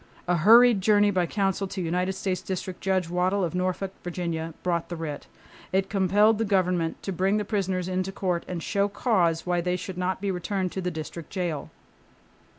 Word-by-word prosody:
A 175 0 +2
hurried 230 +4 +7
journey 205 +1 +4
by 180 -3 +1
counsel 195 0 0
to 190 - -6
United 180 +2 0
States 190 -1 -2
District 185 -1 -5
Judge 190 -2 +1
Waddill 180 +3 +1
of 170 - -1
Norfolk, 185 +1 -1
Virginia, 165 -2 -3
brought 170 -2 -1
the 175 - -4
writ. 155 -3 -5 0.4
It 190 +1 0
compelled 205 +2 +3
the - - +2
government 180 -5 0
to 195 - -3
bring 190 +3 +1
the 210 - -1
prisoners 190 -3 -1
into 185 +1 -1
court 180 -3 -1
and 175 -3 -4
show 200 0 +1
cause 185 -6 +1
why 175 -1 +1
they 180 +1 0
should 180 0 -6
not 185 +1 -1
be 200 0 -1
returned 185 0 -2
to 190 - -4
the 180 - -1
district 160 0 -7
jail. 175 -6 -3
185 Hz, 190 wpm, -26 LUFS, 175-195 Hz, 0.4 s, hurried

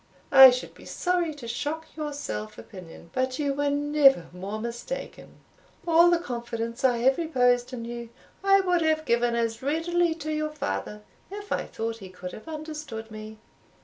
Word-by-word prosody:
I 265 -1 +11
should 250 0 -3
be - - -15
sorry 355 -3 0
to 260 -5 -9
shock 295 +7 -3
your 305 -1 -4
self 215 -7 -5
opinion, 175 -4 -12
but 260 0 -1
you 285 -2 0
were 285 +1 0
never 285 - +4
more 195 +4 -5
mistaken. 235 - -6 0.5
All 340 +1 +6
the 345 - +4
confidence 235 -5 -5
I 250 -2 +4
have 265 +3 +4
reposed 250 -6 +2
in 235 -2 -6
you, 235 0 -6 0.3
I 390 0 +5
would 360 -2 +1
have 315 -1 +1
given 235 -1 +2
as 230 0 -1
readily 330 +4 +1
to 310 -1 -4
your 305 0 -1
father, 210 - -4 0.3
if 410 +1 -8
I - - 0
thought 225 0 -4
he 190 -3 -10
could 180 0 -8
have 215 - -11
understood 305 -8 -7
me. 215 0 -9
265 Hz, 175 wpm, -26 LUFS, 230-315 Hz, 0.5 s, I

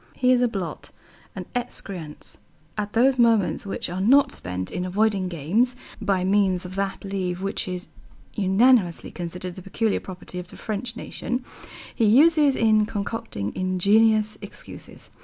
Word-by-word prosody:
He 255 0 +3
is 250 -1 +4
a 245 - +4
blot, 195 -7 -5 0.5
an - - -5
excrescence. 195 -10 -6 0.4
All 210 -1 -2
those 255 +3 +3
moments 230 -2 +3
which - - -3
are 180 +2 -4
not 270 +8 +5
spent 90 +1 -5
in 180 - -3
avoiding 195 +1 +1
games 185 - 0 0.3
(by 195 -3 +1
means 190 -2 +2
of 180 - -7
that 195 0 -3
leave 190 -2 -3
which 195 - -2
is 180 0 -4 0.5
unanimously 200 -1 +3
considered 180 +1 -6
the 185 - -10
peculiar 210 +4 0
property 180 -1 -8
of 180 - -8
the - - -13
French 225 +2 -4
nation) 250 +1 -4 0.5
he 230 - +1
uses 290 +5 +5
in 215 -2 +3
concocting 200 - -4
ingenious 210 +4 +3
excuses. - - -9
200 Hz, 150 wpm, -24 LUFS, 180-230 Hz, 0.5 s, not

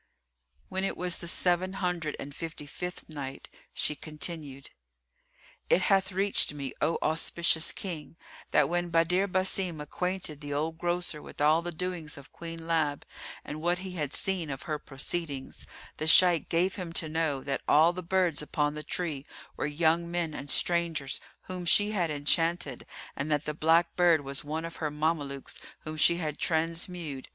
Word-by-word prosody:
When 190 0 -2
it 195 - -1
was 180 -1 +1
the 170 - -4
Seven 180 +2 +1
Hundred 180 -5 -1
and 145 - -6
Fifty 165 -1 -6
fifth 180 +5 -6
Night, 140 -4 -6 0.2
She - - 0
continued, 150 -2 -6 1.0
It 180 - +4
hath 195 0 +3
reached 195 -5 +3
me, 140 -2 -4
O 165 - +2
auspicious 165 +1 +2
King, 165 -5 -6 0.3
that 150 - +4
when 175 +1 0
Badr 170 +3 +3
Basim 185 -3 0
acquainted 170 0 -3
the 145 -1 -4
old 160 +2 -2
grocer 175 -3 0
with - - -12
all 155 +3 +5
the 175 0 -4
doings 170 -3 -4
of 140 -1 -12
Queen 165 -1 -7
Lab 155 -4 +1 0.4
and 150 +1 -6
what 175 +2 +2
he 190 - -5
had 150 -6 -3
seen 185 -5 -1
of 135 -2 -5
her 150 -2 -2
proceedings, 140 0 -4 0.3
the 155 - -2
Shaykh 170 -1 +6
gave 180 +4 +1
him 180 -3 -4
to 165 - +1
know 155 -3 0
that 135 -1 -2
all 160 +4 +6
the 185 - -5
birds 180 -3 +2
upon 150 0 0
the 150 - -5
tree 150 -2 -3 0.3
were - - -1
young 165 +3 +2
men 170 -2 -1
and 145 -1 -6
strangers 165 -6 +1 0.2
whom 185 -1 -3
she 205 +5 +4
had 180 -6 +1
enchanted, 150 -1 0 0.3
and 145 - -3
that 150 -1 +1
the 150 - -1
black 165 +3 +3
bird 175 -3 +5
was 140 -1 0
one 155 +3 -3
of 165 - -7
her 155 - -1
Mamelukes 150 -2 -2 0.2
whom 155 0 -4
she 170 +2 +5
had 155 -4 -3
transmewed. 165 -3 -1
165 Hz, 170 wpm, -29 LUFS, 150-175 Hz, 1.0 s, Shaykh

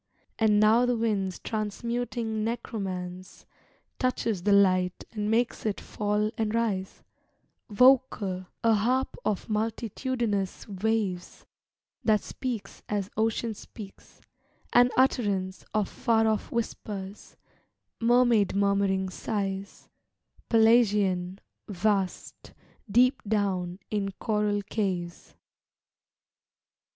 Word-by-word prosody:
And 215 -2 +4
now 225 +4 +5
the 245 -1 +1
wind's 200 -5 -1
transmuting 225 +1 -3
necromance 185 -6 -5 0.5
Touches 230 -6 0
the 205 +3 +1
light 185 -2 +3
and 210 -2 -2
makes 230 +2 +1
it 215 -2 -1
fall 210 0 -1
and 220 0 0
rise, 205 -5 -2 0.7
Vocal, 215 -6 +3 0.2
a 230 -1 +5
harp 245 +5 +1
of 205 -3 -1
multitudinous 220 -1 -2
waves 200 -3 -2 0.6
That 215 -2 +3
speaks 245 -5 -5
as 205 -2 -2
ocean 225 +1 0
speaks 205 -1 -12 0.5
an 245 0 +6
utterance 200 -8 +1
Of 210 -2 +1
far 225 -1 +1
off 215 -1 -1
whispers, 205 -4 -5 0.6
mermaid 235 -4 +3
murmuring 200 -1 +2
sighs 195 0 -4 0.6
Pelagian, 205 -5 +3 0.3
vast, 195 -1 -2 0.4
deep 250 +5 +4
down 195 -4 -1
in 200 -2 -1
coral 210 -1 0
caves. 185 -5 -3
210 Hz, 95 wpm, -27 LUFS, 195-230 Hz, 0.7 s, an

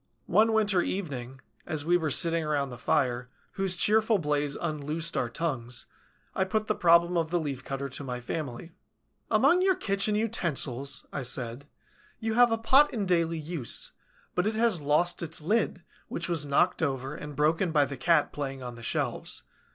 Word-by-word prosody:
One 220 +1 +4
winter 205 -4 +3
evening, 135 -10 -4 0.3
as 150 -2 -2
we 175 +2 +4
were 160 -3 +1
sitting 165 +3 +2
round 145 -3 -1
the 120 - -9
fire, 125 -3 0 0.2
whose 195 -1 0
cheerful 220 +3 +3
blaze 150 -4 0
unloosed 155 +1 -3
our 120 - 0
tongues, 125 -4 -3 0.5
I 190 - +1
put 215 +3 -1
the 215 - +1
problem 170 -1 +4
of 165 -1 0
the 175 +1 +1
Leaf 140 -5 -4
cutter 135 0 -4
to 135 +2 -6
my 125 -2 -4
family: 135 +4 -5 0.6
"Among 360 +2 +4
your 380 0 +4
kitchen 200 -2 0
utensils," 150 - -1
I - - -2
said, 125 +2 -5 0.5
"you 225 0 -1
have 240 0 +5
a 225 - +2
pot 265 +6 +5
in 215 -5 -2
daily 170 -2 +1
use; 155 -6 -4 0.4
but 180 +3 +1
it 215 - -1
has 220 -7 +3
lost 155 +5 +2
its 165 -1 -3
lid, 180 +1 0 0.2
which 170 - -4
was 165 -4 0
knocked 175 +7 +2
over 135 -2 -1
and 150 -1 -8
broken 160 +5 +2
by 150 -2 +4
the 140 - -6
cat 150 +4 +2
playing 135 -2 -4
on 125 -1 -6
the 115 - -11
shelves. 115 - -2
160 Hz, 180 wpm, -28 LUFS, 140-190 Hz, 0.6 s, have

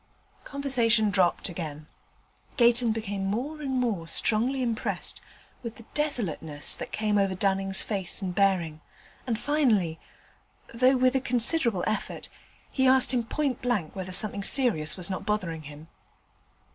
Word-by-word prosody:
Conversation 235 -6 +1
dropped 185 -3 +1
again; 155 -4 -7 0.7
Gayton 240 -1 +4
became 205 -3 -4
more 260 +10 -3
and 280 - -4
more 210 -10 -2
strongly 245 +8 +1
impressed 230 -2 0 0.4
with 230 -2 -7
the 230 - -14
desolateness 170 - -1
that - - -7
came 210 -1 0
over 195 -1 0
Dunning's 195 0 +1
face 195 -4 +1
and 185 -3 -4
bearing, 175 -5 +1 0.5
and 230 -3 -1
finally 225 - +1 0.7
though 255 +3 +3
with 255 +1 +2
a 265 - +2
considerable 240 - +1
effort 215 0 -3 0.4
he 265 -1 +2
asked 260 0 +6
him 240 -2 +1
point 275 0 -2
blank 230 -10 -2
whether 185 -1 -5
something 200 +1 +2
serious 210 - 0
was 185 +1 -1
not 185 - -4
bothering 185 -7 -2
him. 150 +1 -12
215 Hz, 140 wpm, -27 LUFS, 185-250 Hz, 0.7 s, asked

